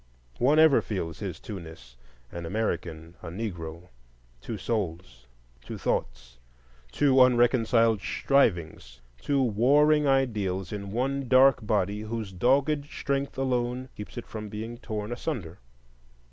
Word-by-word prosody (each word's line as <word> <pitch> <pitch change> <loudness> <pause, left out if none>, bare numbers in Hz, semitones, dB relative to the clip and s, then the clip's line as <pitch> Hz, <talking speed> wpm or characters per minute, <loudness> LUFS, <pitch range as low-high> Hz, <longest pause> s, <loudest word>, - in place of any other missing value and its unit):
One 140 +5 +3
ever 160 -3 +6
feels 85 -6 -4
his - - -5
twoness,—an 60 - -11
American, 85 -5 -3
a - - -9
Negro; 85 -3 -6 0.5
two 110 - -5
souls, 85 - -4 0.4
two - - -7
thoughts, - - -3 0.5
two 135 - +4
unreconciled 120 -3 +4
strivings; 85 - 0 0.2
two 140 - +1
warring 145 +7 +3
ideals 105 -9 0
in 100 -2 -5
one 135 +5 -2
dark 130 0 +5
body, 105 -1 0
whose 110 -2 -5
dogged 140 - +2
strength 140 -2 -3
alone 125 -1 -1
keeps 105 +4 -9
it 120 - -5
from 105 -1 -7
being 115 +3 -6
torn 110 -1 -5
asunder. 115 - -5
110 Hz, 120 wpm, -27 LUFS, 85-130 Hz, 0.5 s, ever